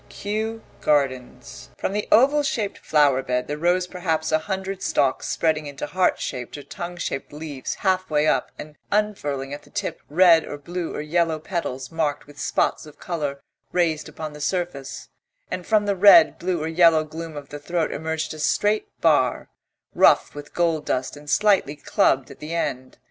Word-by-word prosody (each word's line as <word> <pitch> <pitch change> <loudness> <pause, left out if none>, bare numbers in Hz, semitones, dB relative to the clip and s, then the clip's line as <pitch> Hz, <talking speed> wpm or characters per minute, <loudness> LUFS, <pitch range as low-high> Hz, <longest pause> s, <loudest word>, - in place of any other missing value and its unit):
KEW 220 +2 -4 0.2
GARDENS 135 -4 -1
From - - -2
the 210 0 -2
oval 280 +6 +5
shaped 225 -8 -2
flower 145 -4 +3
bed 125 -1 -2
there 145 - -2
rose 175 +4 +1
perhaps 170 -3 -2
a 155 - +3
hundred 190 +2 -4
stalks 135 -2 +1
spreading 155 -2 0
into 140 -1 -5
heart 185 0 +1
shaped 125 +2 -5
or 145 - -9
tongue 175 +5 -7
shaped 135 -5 -4
leaves 145 -3 -5
half 185 -1 0
way 150 -1 +2
up - - +1
and 150 0 -10
unfurling 145 -10 -1
at 145 - -6
the - - -20
tip - - -4
red 165 +1 +6
or 145 - -7
blue 170 +4 -5
or - - -3
yellow 165 +1 +1
petals 145 -6 -4
marked 155 -3 -1
with 145 0 -15
spots - - 0
of 150 - -14
colour 145 -6 -3 0.3
raised 165 -4 0
upon 155 -1 -7
the 150 - -10
surface; 170 -5 -3 0.4
and 185 -1 -4
from 215 -1 +3
the 200 -1 +1
red, 205 - +7
blue 175 -3 -1
or - - -2
yellow 165 -1 +5
gloom 160 0 -7
of 145 -1 -9
the 145 - -7
throat 170 +3 -1
emerged 160 +1 -3
a 155 - -9
straight 205 +7 +1
bar, 145 -6 +2 0.4
rough - - +4
with 145 0 -10
gold 165 -3 +1
dust 130 +2 -2
and 145 0 -12
slightly 195 -4 +3
clubbed 135 -2 +1
at 140 - -13
the 155 +2 -5
end. 130 -6 -3
160 Hz, 180 wpm, -23 LUFS, 145-180 Hz, 0.4 s, red